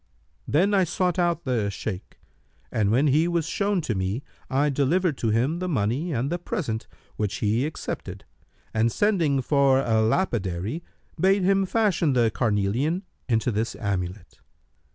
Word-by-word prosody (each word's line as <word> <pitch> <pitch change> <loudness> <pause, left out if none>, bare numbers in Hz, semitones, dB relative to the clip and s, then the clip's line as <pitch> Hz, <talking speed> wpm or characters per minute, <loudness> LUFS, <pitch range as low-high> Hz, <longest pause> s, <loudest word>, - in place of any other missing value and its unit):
Then 185 +8 +2
I 195 -2 +4
sought 180 +1 0
out 170 -1 +1
the 115 -6 0
Shaykh 100 -1 -6 0.5
and 105 -3 +1
when 125 +7 +3
he 150 +4 +3
was 170 -2 0
shown 200 +2 0
to 120 - -2
me 95 +6 -2 0.3
I 145 +2 +2
delivered 155 +5 +1
to 115 - 0
him 125 +10 +1
the 185 0 -2
money 135 - 0
and 135 +2 -1
the 175 - -1
present, 120 -10 -3 0.3
which 105 -3 -1
he 110 +6 +1
accepted 155 - -6 0.5
and 115 +1 +2
sending 165 - +2
for 140 -1 +4
a 110 -4 +2
lapidary, 110 - -1 0.4
bade 195 +2 +3
him 195 +1 +3
fashion 190 -9 +2
the 120 -3 +3
carnelian 120 - 0 0.3
into 115 +1 +2
this 110 +2 -2
amulet. 95 -2 -4
135 Hz, 155 wpm, -25 LUFS, 110-175 Hz, 0.5 s, I